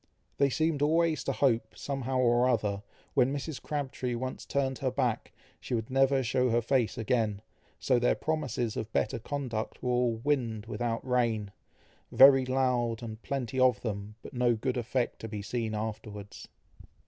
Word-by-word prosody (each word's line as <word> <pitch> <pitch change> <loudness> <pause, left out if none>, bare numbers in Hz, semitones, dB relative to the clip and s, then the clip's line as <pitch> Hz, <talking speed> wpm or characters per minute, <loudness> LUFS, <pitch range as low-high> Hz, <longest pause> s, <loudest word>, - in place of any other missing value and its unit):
They 140 0 +4
seemed 155 +1 0
always 160 +1 +2
to - - +1
hope, 115 -5 +1
somehow 135 -2 -2
or 125 0 +4
other, 100 -5 0 0.3
when 125 +2 +3
Mrs. 145 +1 -4
Crabtree 135 -4 -3
once 130 +2 -5
turned 135 -2 -1
her 130 - 0
back, 125 -3 -1 0.3
she 125 - -3
would 110 +1 -3
never 135 0 +3
shew 125 +1 +1
her 120 +1 +3
face 120 -1 +1
again; 110 -2 0 0.4
so 125 -2 +2
their 125 - +3
promises 130 -8 -2
of 110 0 -4
better 125 - 0
conduct 125 -3 -4
were 125 - 0
all 120 -1 +2
"wind 120 -7 0
without 120 +1 -3
rain," 115 -5 +1 0.6
very 135 -1 +8
loud 125 -3 0
and 110 -1 -7
plenty 130 -1 -3
of 125 -5 +4
them, 105 0 -4
but - - -10
no 120 -1 +2
good 125 +3 -2
effect 125 +1 -1
to 110 - -6
be 105 -2 -5
seen 110 0 -2
afterwards. 105 -2 -6
125 Hz, 165 wpm, -30 LUFS, 110-135 Hz, 0.6 s, very